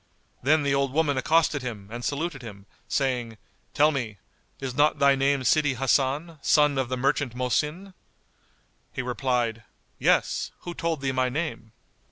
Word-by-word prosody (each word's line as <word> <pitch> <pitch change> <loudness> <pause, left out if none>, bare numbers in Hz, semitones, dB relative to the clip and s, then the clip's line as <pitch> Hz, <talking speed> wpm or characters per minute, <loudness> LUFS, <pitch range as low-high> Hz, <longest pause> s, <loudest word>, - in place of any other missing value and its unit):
Then 150 +3 +3
the 140 -1 +1
old 140 -1 0
woman 150 -2 +2
accosted 155 +2 +2
him 110 -6 -6
and 120 +1 -6
saluted 145 0 -2
him, 100 -4 -10 0.2
saying, 125 -5 -1 0.4
"Tell 150 +2 +5
me, 120 -8 -4 0.4
is 135 -2 -4
not 145 +4 +3
thy 140 0 +5
name 135 0 +1
Sidi 145 0 +3
Hasan, 140 +5 0
son 150 -2 +3
of 130 -2 -1
the 130 - -2
merchant 135 -1 0
Mohsin?" 150 +9 -1 1.0
He 130 - -4
replied, 120 -2 -1 0.4
"Yes, - - +2
who 175 - -6
told 165 -4 -2
thee 135 -1 0
my 130 -1 +1
name?" 140 -5 -4
135 Hz, 155 wpm, -26 LUFS, 125-150 Hz, 1.0 s, Tell